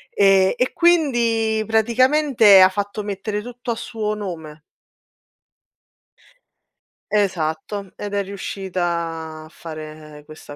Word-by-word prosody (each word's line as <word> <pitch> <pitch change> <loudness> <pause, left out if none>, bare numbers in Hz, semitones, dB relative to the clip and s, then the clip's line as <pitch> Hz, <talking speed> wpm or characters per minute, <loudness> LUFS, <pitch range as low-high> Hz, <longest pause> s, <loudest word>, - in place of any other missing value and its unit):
Ehm, 195 -1 +4
e 250 - 0
quindi 235 -10 +2
praticamente 235 -1 +4
ha 185 - +8
fatto 205 +2 -4
mettere 205 +1 -4
tutto 245 +1 -6
a - - -2
suo 220 -2 -4
nome. 165 -7 -7 2.5
Esatto. 190 0 -1
Ed 205 0 -6
è 200 0 0
riuscita 170 -5 -4
a 155 - -14
fare 155 -2 -10
questa 155 -1 -12
200 Hz, 100 wpm, -21 LUFS, 165-225 Hz, 2.5 s, ha